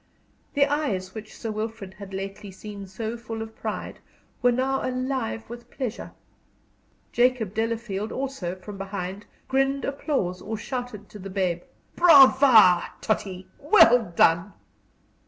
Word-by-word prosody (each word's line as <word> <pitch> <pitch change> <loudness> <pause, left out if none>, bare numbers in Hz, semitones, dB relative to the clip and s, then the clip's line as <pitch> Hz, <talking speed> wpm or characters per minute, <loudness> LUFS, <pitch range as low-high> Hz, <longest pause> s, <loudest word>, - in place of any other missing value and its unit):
The 280 0 +5
eyes 225 -11 -2
which 215 -1 -9
Sir 225 - -4
Wilfrid 215 -2 -5
had 200 0 -11
lately 195 +1 -6
seen 200 +1 -9
so 220 +4 -5
full 225 -1 -6
of 220 0 -11
pride - - -5 0.4
were 245 -1 +4
now 265 +2 0
alive 255 -3 -2
with 240 +1 -10
pleasure. 250 -5 -5 1.0
Jacob 240 -5 +2
Delafield, 225 -2 -2
also, 260 -10 -4
from 195 +2 -10
behind, 195 0 -5 0.2
grinned 270 +1 +1
applause 270 - -2
or 220 +1 -4
shouted 245 -3 -6
to 210 - -11
the 195 +1 -7
babe, 185 -3 -1 0.3
"Brava, 265 - +7 0.2
Tottie; 190 -4 -2
well 245 - +5
done!" 170 +5 +3
220 Hz, 130 wpm, -25 LUFS, 195-255 Hz, 1.0 s, Brava